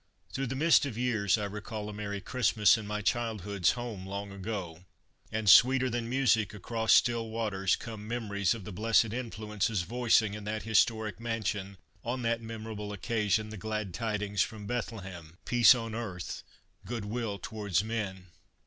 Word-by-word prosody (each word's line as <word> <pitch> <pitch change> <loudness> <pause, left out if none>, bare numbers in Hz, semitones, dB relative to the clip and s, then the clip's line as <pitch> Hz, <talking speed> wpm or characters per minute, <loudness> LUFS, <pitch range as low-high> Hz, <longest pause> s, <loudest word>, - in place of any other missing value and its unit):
fs«^ - - -23
THROUGH 135 0 -2
the 135 - -3
mist 155 +2 +5
of 115 -5 -6
years 115 -5 +2
I 105 - -2
recall 105 +1 -5
a 105 - -6
Merry 100 -1 -4
Christmas 105 -2 +3
in 110 -2 -5
my 105 0 -3
childhood's 105 -5 0
home 120 -6 -6
long 100 +1 -5
ago, 95 -4 -5 0.5
and 110 0 -2
sweeter 130 +5 +7
than 115 -1 -2
music 115 -5 +2
across 110 +2 -1
still 115 -2 +4
waters 105 -4 0
come 110 -3 -8
memories 105 -3 0
of 110 - -8
the 105 - -7
blessed 110 +2 +2
influences 110 -4 -2
voicing 115 +1 +2
in 105 0 -6
that 110 +1 -3
historic 110 -1 +2
mansion 105 -4 -3 0.3
on 125 +1 -3
that 115 0 0
memorable 110 -2 -6
occasion 105 0 0
the 110 - -7
glad 110 -2 -3
tidings 105 -1 -1
from 110 -3 -2
Bethlehem: 95 -8 -5
"Peace 120 +1 +7
on 115 -2 -4
earth, 100 -6 -5 0.4
good 115 -4 -4
will 110 -1 -3
towards 100 -1 -1
men." 105 -5 -4
110 Hz, 165 wpm, -30 LUFS, 100-115 Hz, 0.5 s, sweeter